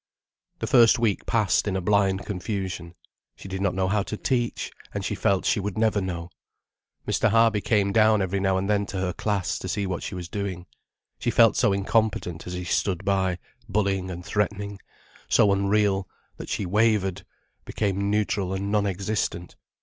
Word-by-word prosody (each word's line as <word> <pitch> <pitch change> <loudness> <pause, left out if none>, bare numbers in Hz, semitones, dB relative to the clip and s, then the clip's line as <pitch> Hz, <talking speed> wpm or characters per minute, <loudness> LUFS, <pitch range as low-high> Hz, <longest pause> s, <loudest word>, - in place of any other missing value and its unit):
The - - -3
first 120 0 +6
week 115 -5 0
passed 105 -4 +2
in 100 - -1
a - - 0
blind 95 -1 +1
confusion. 95 -4 -4 0.4
She - - -11
did 95 0 -4
not 100 -2 0
know 95 0 +1
how 100 +2 +1
to 105 +2 -5
teach, 120 -1 -1 0.2
and - - -2
she - - -1
felt 95 -1 +1
she - - +2
never 105 +3 +1
would - - -2
know. 85 -1 -5 0.8
Mr. - - +2
Harby 115 -2 +4
came 100 -3 +2
down 110 0 +4
every 95 0 -1
now 95 -1 +1
and 95 +1 -1
then 100 -1 +1
to 100 - -5
her 95 -1 -1
class, 100 -3 -1
to - - -6
see 100 - -1
what 95 -2 -3
she - - -5
was 90 -2 -6
doing. 95 -2 -4 0.5
She 120 - -1
felt 115 0 +5
so 110 -5 +3
incompetent 100 -4 0
as 90 - -5
he 90 0 -4
stood 90 0 -1
by, 95 -2 +1 0.3
bullying 95 -2 0
and 90 0 -7
threatening, 100 -1 -2 0.5
so 100 - +5
unreal, 100 -1 +1 0.3
that - - -8
she 100 - -2
wavered, 105 -1 +1 0.4
became 100 -1 -1
neutral 100 -2 0
and 100 +1 -3
non 105 -1 +2
existent. 95 -2 -3
100 Hz, 180 wpm, -25 LUFS, 95-105 Hz, 0.8 s, first